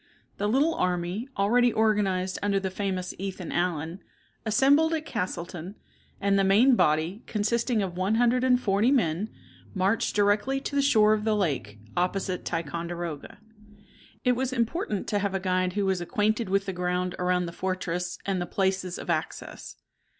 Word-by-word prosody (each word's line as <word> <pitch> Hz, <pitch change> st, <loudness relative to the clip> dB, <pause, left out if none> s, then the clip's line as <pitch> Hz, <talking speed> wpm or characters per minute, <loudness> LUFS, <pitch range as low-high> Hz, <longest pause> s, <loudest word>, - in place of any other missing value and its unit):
The 205 Hz, -, 0 dB
little 285 Hz, +8 st, +3 dB
army, 180 Hz, -, -1 dB
already 240 Hz, +5 st, +3 dB
organized 200 Hz, -4 st, +1 dB
under 200 Hz, -1 st, +1 dB
the 190 Hz, -1 st, -3 dB
famous 185 Hz, -2 st, -3 dB
Ethan 190 Hz, -2 st, -5 dB
Allen, 170 Hz, 0 st, -1 dB, 0.5 s
assembled 285 Hz, +8 st, +4 dB
at 310 Hz, -1 st, -4 dB
Castleton, 180 Hz, -, -4 dB, 0.4 s
and 200 Hz, 0 st, +2 dB
the -, -, +3 dB
main 220 Hz, +7 st, +5 dB
body, 160 Hz, +4 st, +1 dB
consisting 225 Hz, +1 st, 0 dB
of 180 Hz, -2 st, -4 dB
one 190 Hz, +4 st, +1 dB
hundred 245 Hz, +2 st, +3 dB
and 250 Hz, -1 st, +4 dB
forty 205 Hz, +1 st, +2 dB
men, 205 Hz, -, +1 dB, 0.5 s
marched 195 Hz, +4 st, +1 dB
directly 205 Hz, +6 st, +2 dB
to 280 Hz, -, -5 dB
the 280 Hz, -, +4 dB
shore 215 Hz, -6 st, +5 dB
of 215 Hz, -1 st, -1 dB
the 220 Hz, -1 st, +2 dB
lake, 140 Hz, -, -1 dB, 0.2 s
opposite 180 Hz, +1 st, -1 dB
Ticonderoga. 170 Hz, 0 st, -4 dB, 0.9 s
It 250 Hz, -, +4 dB
was 260 Hz, +1 st, -1 dB
important 235 Hz, -, -1 dB
to 205 Hz, -, +1 dB
have 200 Hz, -1 st, -1 dB
a -, -, +1 dB
guide 185 Hz, -1 st, 0 dB
who 205 Hz, 0 st, 0 dB
was 190 Hz, -2 st, 0 dB
acquainted 215 Hz, +2 st, 0 dB
with 195 Hz, +1 st, +1 dB
the 190 Hz, -, -3 dB
ground 180 Hz, 0 st, -1 dB
around 180 Hz, 0 st, +1 dB
the 170 Hz, -, -5 dB
fortress 180 Hz, -1 st, -3 dB
and 190 Hz, -2 st, -1 dB
the 175 Hz, -, -3 dB
places 190 Hz, -2 st, -1 dB
of -, -, -8 dB
access. 155 Hz, -1 st, -4 dB
195 Hz, 165 wpm, -27 LUFS, 180-220 Hz, 0.9 s, main